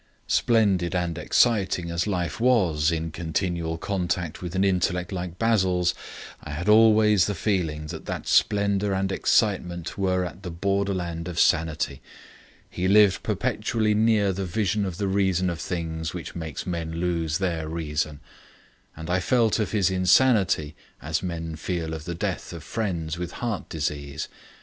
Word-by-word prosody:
Splendid 100 -7 +2
and 85 -2 -1
exciting 95 -7 +2
as 85 +4 -1
life 90 -2 -2
was 90 -11 +3
in 80 0 -2
continual 85 0 -2
contact 90 -3 -2
with 90 0 -5
an 95 - +2
intellect 90 -1 0
like 90 -2 -5
Basil's, 95 -6 +2 0.5
I 75 - -6
had 85 +6 -4
always 105 -2 +5
the 105 - -2
feeling 80 -6 -1
that 80 - -9
that - - -4
splendour 100 -1 +2
and 95 0 -1
excitement 90 -5 0
were 95 -1 +1
on 90 0 -8
the 95 - -6
borderland 90 -2 -2
of 85 -2 -3
sanity. 80 -4 +1 0.7
He 90 - -2
lived 100 -1 +5
perpetually 110 -2 0
near 105 -2 +3
the 95 +2 -3
vision 100 +2 0
of 90 -3 -4
the 100 -1 -1
reason 95 -2 +1
of 85 - -6
things 80 -1 -4
which 90 - -6
makes 80 -5 -5
men 85 -2 -3
lose 85 -2 -1
their 85 -5 -2
reason. 75 -2 -3 0.8
And 80 0 -7
I 90 +1 +1
felt 115 +2 +2
of 110 - -1
his 100 -3 +2
insanity 95 - +3 0.3
as 80 +1 -2
men 80 -3 -4
feel 80 0 -3
of 80 -1 -6
the 85 - -4
death - - -3
of - - -8
friends 85 -7 -3
with 90 -1 -4
heart 115 -5 -4
disease. 75 -1 -3
90 Hz, 155 wpm, -25 LUFS, 80-100 Hz, 0.8 s, always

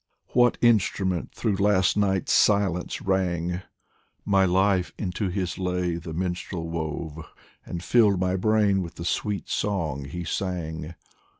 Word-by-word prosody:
What 120 0 +3
instrument 95 -6 +2
through 105 -5 0
last 100 -2 +3
night's 95 -3 +1
silence 95 -4 +2
rang? 90 -2 0 0.6
My 95 -1 +4
life 95 0 +2
into 95 0 -2
his 90 -1 -3
lay 90 -2 -1
the 85 -1 -7
minstrel 90 0 -3
wove, 80 -1 -4 0.5
And 85 0 -5
filled 105 -5 +4
my 95 0 +1
brain 105 0 +2
with 85 -1 -7
the 85 - -7
sweet 100 +2 -2
song 80 -9 -2
he 85 +6 -5
sang. 85 -3 -4
90 Hz, 130 wpm, -25 LUFS, 85-100 Hz, 0.6 s, My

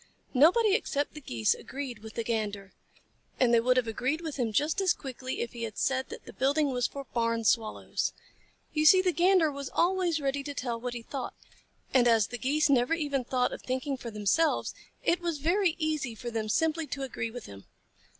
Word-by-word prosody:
Nobody 365 - +5
except 290 -9 0
the 300 - -9
Geese 115 - +1
agreed 265 -4 -6
with 220 0 -11
the 230 - -1
Gander, 210 -4 -3 0.7
and 245 -2 +4
they 235 - +6
would 250 +2 +2
have 250 - +3
agreed 260 +8 -1
with 320 -4 -5
him 240 -4 0
just 300 - +1
as 375 -2 +3
quickly 260 -1 -5
if 235 - -4
he 235 - -8
had 220 -3 -5
said 265 0 0
that - - -9
the - - -10
building 280 +2 +1
was 245 -1 +1
for 280 - -7
Barn 230 -1 0
Swallows. 220 0 0 0.6
You 305 - +1
see 370 +3 +7
the 365 - +3
Gander 350 -2 +4
was 280 -1 -6
always 355 -2 +1
ready 280 0 -1
to 285 0 -6
tell 235 -3 -3
what 245 0 -4
he 235 - -6
thought, 270 +2 -5 0.6
and 245 -2 +5
as 225 -4 +4
the 245 - -6
Geese 295 +5 +2
never 265 +2 +3
even 285 -5 -1
thought 250 0 0
of - - -7
thinking 260 +2 -2
for 250 -2 -7
themselves, 215 +10 +1 0.3
it 350 +1 +2
was 340 -3 -1
very 345 +4 +2
easy 305 -7 -1
for 240 +2 -6
them 220 -1 -2
simply 320 +5 +1
to 275 - -4
agree 235 -3 -3
with 245 0 -8
him. 100 -1 -11
265 Hz, 210 wpm, -29 LUFS, 235-310 Hz, 0.7 s, see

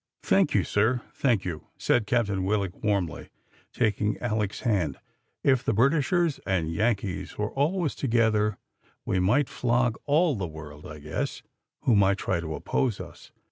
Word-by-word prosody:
"Thank - - +3
you, - - +4
sir, 120 +4 +1
thank 115 -8 +1
you," 80 -4 -5
said 115 -4 +1
Captain 105 -6 +1
Willock 100 -2 -1
warmly, 100 -6 -1 0.4
taking 105 -2 0
Alick's 105 -4 -2
hand. 95 - 0 0.5
"If 130 -3 +3
the - - +1
Britishers 150 - +2
and 85 -4 -1
Yankees 100 0 -1
were 105 0 -2
always 155 +3 0
together, 110 -5 +1 0.5
we 95 - 0
might 105 +10 +3
flog 120 -1 0
all 155 +2 +3
the 95 -7 -3
world, 75 -1 -10
I 75 - -8
guess, 75 +1 -4 0.4
who 120 - +3
might 100 -1 +4
try 90 -2 -1
to 80 -2 -4
oppose 110 - -1
us." - - -11
105 Hz, 150 wpm, -27 LUFS, 95-125 Hz, 0.5 s, you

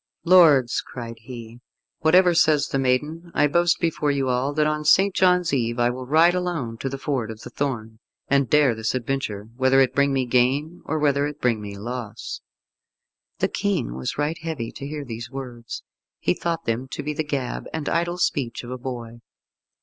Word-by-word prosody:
"Lords," 155 -9 +6
cried 115 -2 -8
he, 115 0 -10 0.4
"whatever 180 +3 +5
says 155 -3 +3
the 135 - 0
maiden, 150 +7 0
I 150 - +4
boast 170 +3 +2
before 160 -3 0
you 135 -2 0
all 125 +3 +1
that 150 +1 +2
on 150 0 0
St. 190 +6 +5
John's 180 -4 +3
Eve 120 -3 0
I 120 0 +2
will 125 0 -7
ride 160 +5 +5
alone 165 -11 -3
to 135 - -2
the 135 - -5
Ford 130 -5 -2
of 110 -1 -8
the - - -9
Thorn, 115 -6 -3 0.3
and 140 -3 +2
dare 150 -5 +4
this 110 +2 -2
adventure, 115 -5 -3
whether 130 0 +4
it 130 -1 +3
bring 140 0 +3
me 135 -1 +1
gain 135 +7 +1
or 160 - -1
whether 145 -1 +2
it 150 0 -8
bring 115 -4 +1
me 100 -1 -7
loss." 115 0 -6 1.0
The - - +1
King 195 - -1
was 65 0 -4
right 150 +3 -1
heavy 160 -8 -4
to 140 - -7
hear 150 -1 -5
these 115 -1 -6
words. 125 -4 -7 0.3
He 90 - +1
thought 165 - -3
them 115 +3 -1
to - - -4
be 150 +1 -2
the 155 - -2
gab 140 -4 -3
and 155 -2 -4
idle 170 +1 0
speech 135 -9 -1
of 120 - -8
a 130 - -5
boy. 120 -2 -6
135 Hz, 195 wpm, -23 LUFS, 120-155 Hz, 1.0 s, Lords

